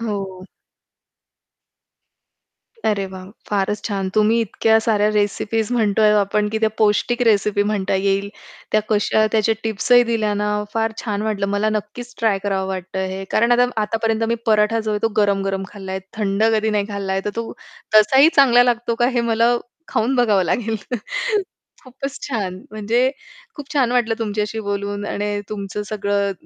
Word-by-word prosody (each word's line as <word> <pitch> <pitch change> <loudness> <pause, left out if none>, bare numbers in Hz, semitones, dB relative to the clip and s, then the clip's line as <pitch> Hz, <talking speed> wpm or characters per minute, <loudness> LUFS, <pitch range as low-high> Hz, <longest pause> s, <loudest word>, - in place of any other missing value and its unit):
हो. 195 -4 -4 2.4
अरे 205 -2 +1
वाह! 185 -1 -9 0.2
फारच 205 +1 -1
छान. 195 -3 -2
तुम्ही 215 +2 +3
इतक्या 220 +1 +2
साऱ्या 210 -2 +2
रेसिपीज 210 +1 0
म्हणतो 220 -3 +2
आहे 210 0 +6
आपण, 205 +1 +1
की 220 +1 -2
त्या 220 0 +2
पौष्टिक 220 +3 +2
रेसिपी 210 -2 +3
म्हणता 205 -2 -1
येईल. 195 +1 0 0.4
त्या 215 - +4
कशा 215 0 +2
त्याचे 220 0 +2
टिप्स 220 +2 -3
ही 245 0 +8
दिल्या 215 -2 0
ना, 210 0 -1 0.3
फार 225 0 0
छान 210 -3 -2
वाटलं 210 -2 -1
मला 205 +2 0
नक्कीच 215 +3 -5
ट्राय 220 -4 +2
करावं 195 -2 -1
वाटतं 190 0 -4
हे. 190 +1 -5
कारण 235 +2 +3
आता 245 +1 +4 0.2
आतापर्यंत 225 +1 -1
मी 235 - +2
पराठा 215 +1 +3
जो 215 -1 -3
आहे 210 - 0
तो 225 - +3
गरम-गरम 195 -2 +1
खाल्ला 195 -2 -7
आहे 190 - -3 0.2
थंड 200 -1 0
कधी 220 0 +1
नाही 205 -1 0
खाल्ला 200 -2 -3
आहे. 190 - 0
तर 210 - -1
तो 230 0 -4 0.4
तसाही 265 +8 +7
चांगला 245 -3 +6
लागतो 240 -1 0
का - - +5
हे - - +4
मला 235 +1 +2 0.3
खाऊन 225 +5 0
बघावं 215 -6 +3
लागेल. 220 +5 -1 1.1
खूपच 265 +2 -7
छान, 210 -9 -3 0.2
म्हणजे 225 +5 +1 0.5
खूप 290 0 -9
छान 255 -4 +2
वाटलं 235 -2 +2
तुमच्याशी 215 0 -2
बोलून. 205 0 -3
आणि 205 0 -2
तुमचं 205 0 -5
सगळं 200 -1 -1
210 Hz, 165 wpm, -20 LUFS, 200-225 Hz, 2.4 s, ही